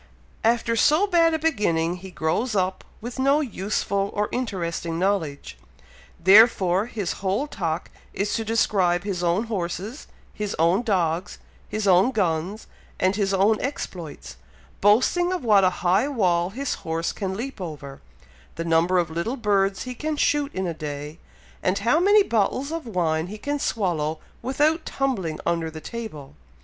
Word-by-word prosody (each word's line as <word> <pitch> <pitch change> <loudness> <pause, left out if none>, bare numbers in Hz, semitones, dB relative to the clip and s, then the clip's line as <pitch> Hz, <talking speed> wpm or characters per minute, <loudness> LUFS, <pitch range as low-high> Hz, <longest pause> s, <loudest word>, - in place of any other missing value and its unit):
After 230 0 +2
so 305 - +4
bad 335 -4 +3
a - - +1
beginning, 180 - 0
he 190 +1 -10
grows 180 +8 -1
up 185 -1 0 0.2
with 240 +3 -7
no 275 +3 +4
useful 200 -5 -1
or 210 0 0
interesting 170 -8 -3
knowledge; 165 - -2 0.6
therefore 195 0 +5
his 205 -7 -3
whole 200 +8 0
talk 165 - -3 0.2
is 200 +1 -2
to 225 - -1
describe 195 -5 +1
his 195 -4 -3
own 175 +5 +2
horses, 205 - -4 0.3
his 210 -1 -3
own 170 +6 +3
dogs, 180 -6 -1 0.3
his 215 -1 -2
own 185 +5 +5
guns, 190 -2 -1 0.3
and 185 +2 +2
his 200 -2 0
own 200 +3 +3
exploits; 180 - -6 0.4
boasting 255 - +3
of 365 -6 -2
what 210 -4 +5
a 185 - +5 0.2
high 190 +9 +3
wall 180 -10 +1
his 270 +7 -3
horse 165 +1 -2
can 190 -2 -4
leap 255 -2 -6
over, 145 -5 -7 0.5
the 165 - -4
number 170 +2 +3
of 170 -2 +1
little 170 +11 -2
birds 200 -4 +1
he 255 - -5
can 305 +4 -3
shoot 290 0 +1
in 190 - -1
a 170 - -2
day, 150 0 -6 0.4
and 195 - +1
how 235 +10 +2
many 405 +3 +5
bottles 245 - 0
of 325 -5 -4
wine 165 -5 0
he 210 +3 -7
can 290 +6 -3
swallow 165 - -1 0.2
without 295 +6 +1
tumbling 205 - -2
under 165 -1 0
the 160 0 -8
table. 155 - -7
195 Hz, 160 wpm, -24 LUFS, 170-240 Hz, 0.6 s, therefore